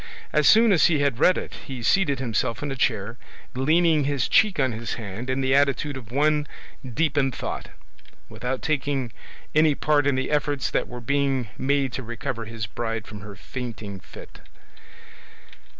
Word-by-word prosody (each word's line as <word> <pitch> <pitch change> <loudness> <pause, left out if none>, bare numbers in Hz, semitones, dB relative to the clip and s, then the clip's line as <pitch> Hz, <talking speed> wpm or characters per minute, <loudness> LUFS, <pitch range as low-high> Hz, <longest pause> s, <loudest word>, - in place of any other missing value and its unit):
As 150 -1 +4
soon 225 0 +7
as 180 - +5
he 155 -4 +2
had 140 -4 +1
read 180 +4 +5
it - - -5
he 130 -3 -6
seated 150 0 +3
himself 115 -1 -1
in 145 - -3
a - - -3
chair, 115 -1 -1 0.3
leaning 155 +3 +3
his 140 -1 0
cheek 210 -6 +3
on 130 -2 +2
his 115 +1 -4
hand 110 +2 -6
in 130 +1 0
the 130 0 +2
attitude 140 +1 +2
of 125 -5 -9
one 150 +2 +2 0.4
deep 145 +3 0
in 135 -1 +2
thought, - - -5 0.6
without 125 +1 -4
taking 140 -5 -1 0.4
any 155 -1 +4
part 145 -1 +2
in 140 - +2
the 130 +2 -2
efforts 145 -2 0
that - - 0
were 125 0 -8
being 135 -2 0
made 135 -1 0
to - - -3
recover 120 0 -5
his 110 -1 -5
bride 115 +1 -4
from 105 -2 -9
her 105 0 -9
fainting 110 -2 -7
fit. - - -13
135 Hz, 175 wpm, -24 LUFS, 120-145 Hz, 0.6 s, soon